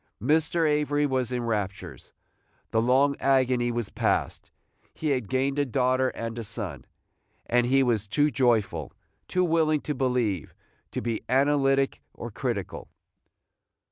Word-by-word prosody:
Mr. 155 +6 +2
Avery 150 -1 +1
was 130 -3 -1
in 125 -1 -2
raptures. 105 -4 -4 0.6
The 110 - +2
long 135 +4 +3
agony 130 -3 +2
was 120 -3 -3
past. - - -1 0.5
He 155 - -2
had 125 -6 -1
gained 135 +2 0
a - - +3
daughter 130 0 +1
and 115 -1 -5
a - - -4
son, 90 - -6 0.6
and 120 0 +2
he 135 +2 +4
was 110 -5 0
too 145 +8 +2
joyful, 110 - +1 0.3
too 180 0 +1
willing 160 -3 +2
to 150 - -3
believe, 125 - -1 0.3
to - - -4
be 115 -2 -2
analytic 135 0 +2
or 120 - -7
critical. 105 - -4
130 Hz, 140 wpm, -26 LUFS, 115-140 Hz, 0.6 s, he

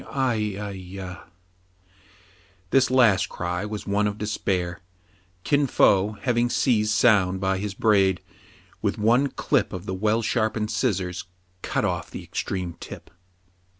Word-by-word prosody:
Ai, 110 -7 0
ai, 105 -1 -4
ya 95 -1 -8
!'^ - - -14 1.5
This 135 -1 +4
last 110 -7 +4
cry 90 +2 -3
was 105 -1 -5
one 105 +1 +1
of 105 0 -3
despair. 95 -5 -2 0.6
Kin 145 -1 +2
Fo, 100 -3 +3
having. 120 +1 0
seized 110 -5 +2
Soun 100 -4 +4
by 95 0 0
his 100 0 -4
braid, 95 -5 +3 0.6
with - - -1
one 120 +6 +3
clip - - 0
of 95 0 -6
the 95 - -3
well 110 +4 +1
sharpened 110 -1 0
scissors 95 -8 -1 0.4
cut - - -1
off - - -2
the - - -8
extreme 90 -3 -4
tip. - - -10
105 Hz, 140 wpm, -24 LUFS, 95-115 Hz, 1.5 s, This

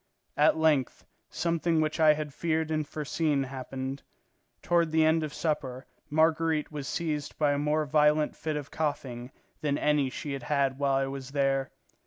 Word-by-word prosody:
At 150 +2 +4
length, 155 -5 +1 0.2
something 170 -1 0
which 155 +1 0
I 155 -1 +7
had 150 -2 -5
feared 160 0 -1
and 155 -1 -1
foreseen 150 -1 -1
happened. 130 +1 -5 0.6
Toward 170 -2 +2
the 160 0 +4
end 160 +1 +3
of 155 -2 -3
supper 145 -4 -3 0.2
Marguerite 160 0 +2
was 145 -2 -5
seized 150 -3 -3
by 150 -2 +3
a 140 - -1
more 150 +1 +1
violent 150 +1 +3
fit 155 -1 -3
of 145 -2 -5
coughing 130 -5 -3 0.3
than 145 -1 0
any 150 -3 +2
she 140 +3 -5
had 135 - -4
had 140 -2 +1
while 140 -1 +2
I 135 0 +2
was 135 -1 -6
there. 135 -2 +1
150 Hz, 170 wpm, -28 LUFS, 135-155 Hz, 0.6 s, I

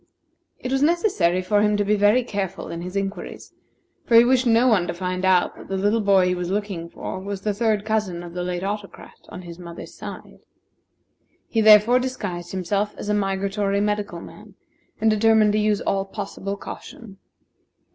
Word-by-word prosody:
It 255 - -6
was 270 0 +1
necessary 290 - +2
for 205 +2 +2
him 210 0 +2
to 205 - 0
be 210 +1 +2
very 210 +5 +4
careful 200 -5 -4
in 170 - -5
his 180 +2 -7
inquiries, 195 0 -5 0.5
for 235 - +3
he 230 +1 +8
wished 255 0 +3
no 230 +1 +4
one 200 -7 +3
to - - -3
find 185 +1 -3
out 185 -1 +3
that - - -12
the 195 - -2
little 205 +4 +1
boy 195 -2 +4
he 180 - +1
was 180 -1 -3
looking 195 -4 -3
for 185 - -6
was 195 0 -5
the 210 0 -1
third 215 -1 0
cousin 210 -6 -1
of 170 -1 -9
the 180 - -4
late 180 0 -3
Autocrat 200 0 -6 0.2
on 180 - -8
the 170 -2 -9
mother's 170 -1 -9
side. - - -10 1.1
He 225 - 0
therefore 215 +3 +7
disguised 205 -9 -4
himself 200 +3 -2
as 205 - -6
a - - +2
migratory 200 0 0
medical 205 -4 -2
man, 210 -2 -13 0.4
and 220 0 +3
determined 215 0 +4
to 215 - +2
use 210 -1 +1
all 195 0 0
possible 200 0 -5
caution. 200 -1 -10
205 Hz, 185 wpm, -23 LUFS, 185-215 Hz, 1.1 s, he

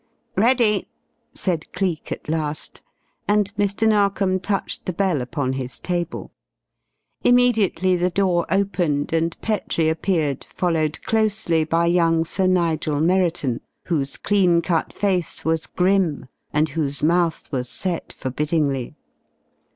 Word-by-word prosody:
"Ready," 225 -1 +3 0.5
said 170 -4 -2
Cleek 180 -4 -2
at - - -5
last, 155 -1 -3 0.5
and 205 0 +1
Mr. 205 +1 +1
Narkom 200 -3 +2
touched 195 +1 -3
the 185 - -1
bell 180 -6 +1
upon 130 +1 -2
his 130 -1 -5
table. 175 -1 -3 0.9
Immediately 220 -7 +3
the 180 +1 +1
door 180 -1 +1
opened 175 -6 0
and 165 +1 0
Petrie 180 -7 0
appeared 160 -4 0
followed 160 -4 -1
closely 215 -7 +1
by 165 +2 +1
young 165 -1 +3
Sir 185 +3 0
Nigel 165 -5 +1
Merriton, 170 -7 +1 0.2
whose 140 -6 -2
clean 180 -5 +2
cut 170 -3 0
face 185 -5 -1
was 160 0 0
grim 180 -7 +1 0.3
and 150 +1 +1
whose 145 -2 -2
mouth 170 0 +1
was 125 -3 -2
set 180 -3 -3
forbiddingly. 140 -1 -2
170 Hz, 120 wpm, -22 LUFS, 155-195 Hz, 0.9 s, Ready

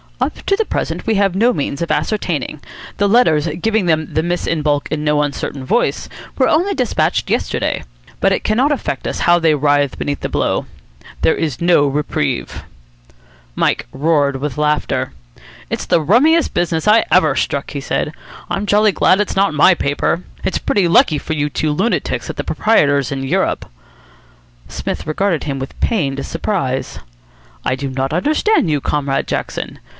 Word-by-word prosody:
"Up - - -2
to 395 - +4
the 445 +2 0
present - - -3
we 225 - +2
have 195 -2 +2
no 230 +5 +4
means 140 -2 -3
of 170 - -2
ascertaining. 170 - -1 0.4
The 200 0 +2
letters 170 -10 +3
giving 220 0 +1
them 160 -2 0
the 155 - +1
miss 175 +1 -2
in 165 -2 0
baulk 145 -1 0
in 155 -1 -2
no 150 0 +2
uncertain 140 -1 -3
voice 230 - 0 0.3
were 260 - +3
only 360 +6 +2
despatched 250 -5 0
yesterday. - - -1 0.4
But - - +3
it - - 0
cannot 250 +7 +2
affect 290 - -2
us - - -3
how 175 0 +5
they 160 -2 +3
writhe 145 -1 +1
beneath 145 -1 -3
the - - -4
blow. - - 0 0.6
There - - +3
is 155 -4 -3
no 170 -4 +4
reprieve." 145 -2 -2 0.9
Mike - - 0
roared 145 -2 +1
with 145 +2 -4
laughter. 150 - 0 0.6
"It's - - -2
the 165 - +3
rummiest 280 - +3
business 165 +1 -1
I 215 +2 +6
ever 155 -6 +4
struck," 140 +1 -2
he 140 - -4
said. 150 - -2 0.4
"I'm 200 +1 -2
jolly 210 +1 +4
glad 190 0 +3
it's 210 - -1
not 195 -3 +2
my 170 +5 +6
paper. 160 +2 -1 0.2
It's - - -1
pretty 195 -4 +1
lucky 190 - +4
for 160 - -4
you 150 -1 -1
two 155 +1 -1
lunatics 195 +11 -1
that - - -6
the - - -2
proprietor's 145 - +2
in 135 -1 -3
Europe." 135 - -1 1.0
Psmith - - -5
regarded 170 +2 0
him 140 -2 -3
with 135 +1 -7
pained 140 - 0
surprise. 165 -7 -2 0.7
"I 130 - +1
do 140 +1 -4
not 135 +2 -2
understand 305 - +2
you, 145 -2 0
Comrade 140 -1 -1
Jackson. - - -4
160 Hz, 170 wpm, -17 LUFS, 145-205 Hz, 1.0 s, I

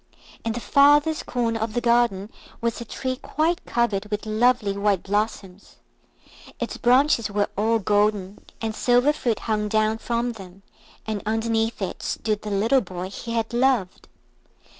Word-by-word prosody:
In 225 - -1
the 240 - -4
farthest 290 +5 +4
corner 230 -2 -1
of 220 0 -3
the - - +2
garden 235 -4 +1 0.3
was 235 0 -2
a - - -6
tree 255 +3 -4
quite 320 +6 -1
covered 215 -4 0
with 210 0 -4
lovely 220 -1 +2
white 200 -2 +1
blossoms. 205 -2 -3 0.8
Its - - -3
branches 250 -1 +3
were 205 0 0
all 225 +3 +2
golden, 205 -1 0 0.2
and 220 -1 -1
silver 245 +6 +3
fruit 240 -7 -2
hung 210 -2 -1
down 215 +1 +1
from 235 +1 -1
them, 195 -3 -12 0.4
and 215 -2 -3
underneath 225 0 0
it 190 - -5
stood 215 -2 -2
the 210 - -6
little 225 +7 +2
boy 185 -2 -6
he 230 +3 -6
had 230 0 -2
loved. 240 -6 +1
225 Hz, 155 wpm, -24 LUFS, 205-240 Hz, 0.8 s, farthest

